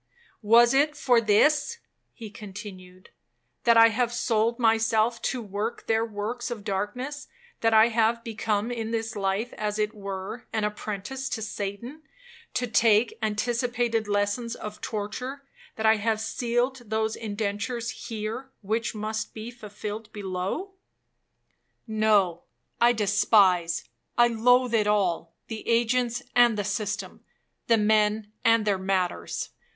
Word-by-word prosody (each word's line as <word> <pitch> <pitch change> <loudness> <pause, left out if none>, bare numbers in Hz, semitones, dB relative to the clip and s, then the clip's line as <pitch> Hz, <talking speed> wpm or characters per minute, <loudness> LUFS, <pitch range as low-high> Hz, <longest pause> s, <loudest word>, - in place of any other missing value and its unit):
'Was 235 +3 +6
it 295 +2 +3
for 245 -5 +3
this,' 295 - +3 0.3
he 220 -4 -10
continued, 190 -3 -10 0.5
'that 235 -1 +6
I 230 0 +8
have 240 +1 0
sold 235 -1 +1
myself 225 0 +2
to 250 -3 -2
work 210 +3 -4
their 225 0 +2
works 225 +3 -4
of 230 -4 -6
darkness,—that 250 - -3
I 220 +1 +6
have 230 0 +1
become 220 -1 -1
in 225 -2 -3
this 225 0 -3
life 200 +4 -1
as 210 0 -2
it 215 0 0
were 200 +2 -6
an 220 -1 -1
apprentice 210 +5 -4
to 220 -4 -3
Satan, 215 +8 -5 0.5
to 250 - +1
take 225 0 +3
anticipated 235 +1 0
lessons 205 +3 -1
of 210 0 -8
torture,—that 250 +3 -6
I 220 0 +5
have 220 +1 0
sealed 240 +3 -1
those 220 0 0
indentures 220 +3 -3 0.2
here, 225 +3 -5
which 220 +3 -1
must 215 0 -4
be 220 +2 -6
fulfilled 215 -1 -7
below? 200 - -4 1.1
No, 210 -6 +2 0.4
I 240 0 +6
despise—I 200 - +2
loathe 245 +2 +3
it 215 -2 +3
all, 180 -5 0
the 220 -1 -7
agents 240 +2 +1
and 240 -3 +5
the 205 - 0
system,—the 210 +2 -3
men 210 0 +2
and 230 -2 +4
their 200 -2 +1
matters. 190 -2 -2
220 Hz, 125 wpm, -26 LUFS, 205-235 Hz, 1.1 s, I